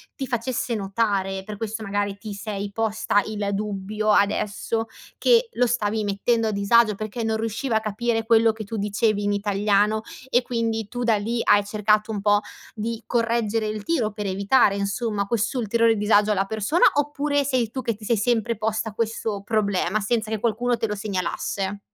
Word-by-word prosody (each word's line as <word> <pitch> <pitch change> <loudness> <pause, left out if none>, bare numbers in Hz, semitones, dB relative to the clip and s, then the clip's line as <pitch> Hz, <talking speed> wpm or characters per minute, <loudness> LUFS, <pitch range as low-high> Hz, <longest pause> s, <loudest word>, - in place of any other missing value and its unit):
ti 270 - -4
facesse 240 0 -2
notare, 195 -2 -1
per 210 +1 -7
questo 220 +1 -4
magari 205 -1 -2
ti 210 0 -7
sei 200 0 -5
posta 215 -1 +1
il 210 -2 -3
dubbio 210 +1 -1
adesso 210 +2 +1 0.3
che 475 -1 +4
lo 250 - +2
stavi 220 -2 0
mettendo 220 +3 +1
a - - 0
disagio, 210 +2 +3
perché 215 +3 -4
non 220 0 0
riusciva 225 +2 -1
a - - +2
capire 225 +1 -1
quello 225 0 +5
che 220 0 -7
tu 220 +2 -6
dicevi 205 +1 0
in 205 - +1
italiano, 205 +1 +1 0.3
e, 245 - +3
quindi, 230 -3 -2
tu 245 +3 -4
da 230 -2 +3
lì 230 +3 -2
hai 205 - +5
cercato 210 +1 +1
un 205 -2 -3
po' 205 0 +3 0.3
di 225 +1 -4
correggere 230 -2 0
il 215 -1 -4
tiro, 245 -9 0
per 210 0 -6
evitare, 200 +3 +3
insomma, 200 +1 -1
quest'ulteriore 230 +1 +1
disagio 210 0 +3
alla 195 -1 +1
persona, 220 - 0
oppure 290 0 +1
sei 255 -4 0
tu 260 - -4
che 230 -2 -1
ti 210 +1 -12
sei 235 - +4
sempre 230 +1 0
posta 220 0 -2
questo 220 -2 -2
problema, 205 -2 0
senza 220 +1 -1
che 220 - -1
qualcuno 240 +2 0
te 225 - -1
lo 210 - -3
segnalasse? 200 0 -3
215 Hz, 180 wpm, -24 LUFS, 205-230 Hz, 0.3 s, quello